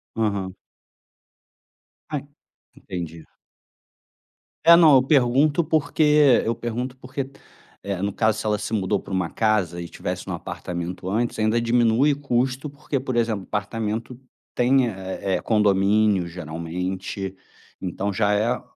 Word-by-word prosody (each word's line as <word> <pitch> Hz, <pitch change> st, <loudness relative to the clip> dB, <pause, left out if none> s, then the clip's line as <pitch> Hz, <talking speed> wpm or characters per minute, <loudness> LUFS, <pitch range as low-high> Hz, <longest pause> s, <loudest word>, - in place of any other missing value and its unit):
Aham. 100 Hz, -4 st, -1 dB, 1.5 s
Ah, 150 Hz, -3 st, -2 dB, 0.5 s
entendi. 85 Hz, -3 st, -7 dB, 1.4 s
É, 170 Hz, +1 st, +9 dB
não, 165 Hz, -3 st, +7 dB
eu 130 Hz, -, +7 dB
pergunto, 140 Hz, +4 st, +3 dB
porque 150 Hz, -3 st, +3 dB
eu 115 Hz, -, +1 dB
pergunto, 120 Hz, +2 st, -4 dB
porque, 130 Hz, +1 st, -5 dB, 0.5 s
eh, 100 Hz, -2 st, -3 dB
no 100 Hz, +1 st, -2 dB
caso, 110 Hz, 0 st, +1 dB
se -, -, -5 dB
ela 105 Hz, -1 st, +1 dB
se 110 Hz, -, -5 dB
mudou 100 Hz, -1 st, +1 dB
pra -, -, -12 dB
uma 95 Hz, -2 st, 0 dB
casa 95 Hz, -3 st, 0 dB
e 85 Hz, -, -7 dB
tivesse -, -, -5 dB
num -, -, -2 dB
apartamento 90 Hz, +1 st, -5 dB
antes 115 Hz, +4 st, -1 dB
ainda 110 Hz, +2 st, +2 dB
diminui 120 Hz, +4 st, +3 dB
o 140 Hz, -, -7 dB
custo, 130 Hz, +1 st, 0 dB
porque, 140 Hz, 0 st, -4 dB
por 130 Hz, -1 st, -4 dB
exemplo, 115 Hz, -4 st, 0 dB
apartamento 110 Hz, +4 st, -3 dB, 0.3 s
tem, 130 Hz, +1 st, +3 dB
eh 95 Hz, -2 st, -3 dB
eh, -, -, -6 dB
condomínio 100 Hz, -2 st, +3 dB
geralmente. 90 Hz, +3 st, -5 dB, 0.5 s
Então 95 Hz, +2 st, -3 dB
já 105 Hz, +1 st, +2 dB
é 115 Hz, +4 st, 0 dB
110 Hz, 135 wpm, -23 LUFS, 95-130 Hz, 1.5 s, É